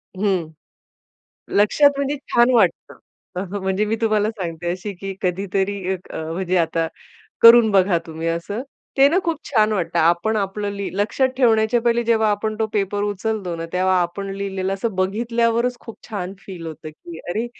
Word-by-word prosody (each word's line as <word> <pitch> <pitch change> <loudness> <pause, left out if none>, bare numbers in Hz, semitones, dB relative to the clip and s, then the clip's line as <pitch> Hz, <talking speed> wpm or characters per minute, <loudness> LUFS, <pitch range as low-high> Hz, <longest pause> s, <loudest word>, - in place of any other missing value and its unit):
हं. 190 -4 0 1.1
लक्षात 210 +8 +5
म्हणजे 280 +1 -1 0.2
छान 240 +1 +5
वाटतं. 235 - +1 0.6
म्हणजे 190 +2 0
मी 215 +1 0
तुम्हाला 215 -1 +2
सांगते 175 -6 -5
अशी, 195 +3 -5
की 195 +2 -6
कधीतरी 195 +2 -1 0.2
एक 185 - -9
अ, - - -5
म्हणजे 185 +1 -1
आता 165 -1 +1 0.5
करून 230 -1 +9
बघा 190 -2 +4
तुम्ही 160 +1 -5
असं, 170 +7 -2 0.4
ते 270 +1 +7
ना 345 - +2
खूप 330 -3 -1
छान 215 -5 +2
वाटतं. 175 -3 -1
आपण 170 +7 +2
आपलं 205 +1 -2
ली 200 -1 -4
लक्षात 240 +6 +1
ठेवण्याच्या 230 -2 +3
पहिले, 235 0 +2
जेव्हा 220 -2 +2
आपण 215 +1 -2
तो 220 - +2
पेपर 205 0 0
उचलतो 205 -3 -2
ना, 165 0 -5
तेव्हा 185 0 +2
आपण 195 +3 -3
लिहिलेलं 195 -1 -2
असं 195 +1 -3
बघितल्यावरच 230 +5 0
खूप 230 - -11
छान 190 -3 -4
फील 180 -4 -8
होतं, 155 0 -8
की 165 +1 -11
अरे, 215 +7 -1
200 Hz, 165 wpm, -21 LUFS, 180-225 Hz, 1.1 s, करून